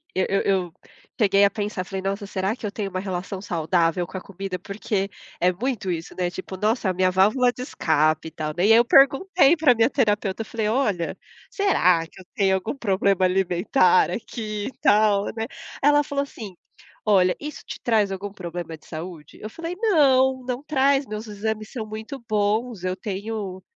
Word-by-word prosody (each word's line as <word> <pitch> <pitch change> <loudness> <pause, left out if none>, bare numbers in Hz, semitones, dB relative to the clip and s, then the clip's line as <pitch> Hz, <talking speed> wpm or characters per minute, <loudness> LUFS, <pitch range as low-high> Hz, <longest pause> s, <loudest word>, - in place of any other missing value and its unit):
eu 185 - +2
eu 195 - +2
eu 185 -4 0 0.5
cheguei 200 -2 +4
a 200 - +4
pensar, 205 -2 -3
falei: 190 +1 -5
"Nossa, 195 +2 -3
será 195 +2 -2
que 245 - -8
eu 205 - -3
tenho 205 -1 -4
uma 185 -1 -3
relação 190 0 -4
saudável 170 -1 0
com 190 - -7
a - - -6
comida?”, 195 -1 -6
porque 200 -1 -3 0.3
é 180 +1 +3
muito 210 -1 -3
isso, 165 -1 -5
né, 180 -1 0
tipo, 185 +1 -7
nossa, 215 +1 0
a - - 0
minha 185 0 +2
válvula 215 +7 +3
de 250 - -9
escape 155 - +1
e - - -27
tal, 155 -1 -4
né. 180 - +2
E 215 - +5
aí - - +7
eu 240 - +4
perguntei 280 +5 +5
pra 295 -6 +4
minha 225 +2 +3
terapeuta, 210 -6 0
eu - - -4
falei: 220 -1 -2
"Olha, 210 -8 0 0.3
será 180 - +2
que 165 - -17
eu - - -16
tenho 195 -2 +3
algum 190 +8 -3
problema 195 -4 +2
alimentar 195 - +3
aqui 215 -3 -5
e - - -5
tal, 205 -1 +4
né?" 225 - -2 0.4
Ela 290 +1 +5
falou 280 -1 -2
assim: 215 -8 -9 0.5
"Olha, 185 -4 +4
isso 300 0 -7
te - - -7
traz 215 -4 +2
algum 195 +1 -5
problema 175 -3 -6
de - - -25
saúde?", 160 -1 -9
Eu 215 - -6
falei: 335 +7 -6
“Não, 265 - +3
não 250 +2 -3
traz, 280 -2 +2
meus 215 +1 -6
exames 215 +1 -4
são 225 -5 -5
muito 220 +5 -7
bons. 215 0 0
Eu 185 0 -1
tenho, 200 -1 -5
205 Hz, 195 wpm, -23 LUFS, 185-240 Hz, 0.5 s, aí